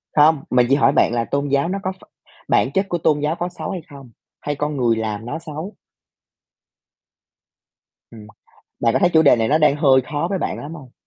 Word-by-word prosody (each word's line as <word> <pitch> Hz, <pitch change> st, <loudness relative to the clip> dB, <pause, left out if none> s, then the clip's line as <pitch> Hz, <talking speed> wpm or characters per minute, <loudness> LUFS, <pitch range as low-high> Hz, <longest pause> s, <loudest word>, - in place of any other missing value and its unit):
Không, 150 Hz, -1 st, +4 dB
mình 125 Hz, -1 st, +3 dB
chỉ 135 Hz, -, +4 dB
hỏi 140 Hz, -1 st, +3 dB
bạn 120 Hz, -, +2 dB
là 120 Hz, -1 st, -1 dB
tôn 140 Hz, +3 st, -2 dB
giáo 140 Hz, +3 st, +1 dB
nó 195 Hz, +2 st, -2 dB
có 185 Hz, -, -1 dB
ph 190 Hz, -, -16 dB, 0.4 s
bản -, -, +2 dB
chất 195 Hz, +6 st, -1 dB
của 175 Hz, -, -1 dB
tôn 155 Hz, -2 st, +1 dB
giáo 150 Hz, +2 st, -1 dB
có 175 Hz, +1 st, -3 dB
xấu -, -, -7 dB
hay 185 Hz, -3 st, -5 dB
không, 135 Hz, -4 st, -13 dB, 0.3 s
hay 145 Hz, -, -3 dB
con 150 Hz, +1 st, -3 dB
người 120 Hz, -3 st, +2 dB
làm 110 Hz, -1 st, -4 dB
nó 145 Hz, +7 st, -5 dB
xấu? 160 Hz, +5 st, -7 dB, 2.4 s
Ừm, 110 Hz, -2 st, -13 dB, 0.5 s
bạn 115 Hz, -, +2 dB
có -, -, +2 dB
thấy 175 Hz, -, +3 dB
chủ 160 Hz, -, +6 dB
đề 140 Hz, -, +5 dB
này 115 Hz, -1 st, 0 dB
nó 150 Hz, -, +3 dB
đang 150 Hz, -2 st, +3 dB
hơi 135 Hz, -3 st, +4 dB
khó 145 Hz, +4 st, -3 dB
với 195 Hz, -, -1 dB
bạn -, -, -3 dB
lắm 150 Hz, +3 st, -8 dB
hông? 135 Hz, -7 st, -13 dB
145 Hz, 220 wpm, -20 LUFS, 130-160 Hz, 2.4 s, chủ